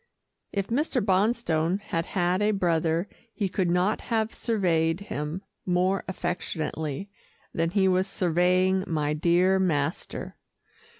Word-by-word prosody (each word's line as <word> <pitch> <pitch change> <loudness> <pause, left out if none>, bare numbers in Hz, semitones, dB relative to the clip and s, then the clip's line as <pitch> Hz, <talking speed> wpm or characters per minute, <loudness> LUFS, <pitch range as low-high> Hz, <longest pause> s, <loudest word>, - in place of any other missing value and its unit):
If 200 -2 -2
Mr. 270 +2 +1
Bonstone 190 -4 +1
had 165 -4 -3
had 180 +1 +1
a 210 - +3
brother, 170 -3 +1 0.3
he 205 - 0
could 185 -1 0
not 180 +5 +1
have 220 -1 -1
surveyed 170 -7 +1
him 160 -1 -4 0.2
more 185 +1 +1
affectionately 175 -1 -3 0.4
than 165 0 0
he 190 +1 +2
was 185 +1 +2
surveying 185 +1 +2
my 150 -2 0
dear 175 +4 +3
master. 160 -4 -1
180 Hz, 120 wpm, -27 LUFS, 165-195 Hz, 0.4 s, a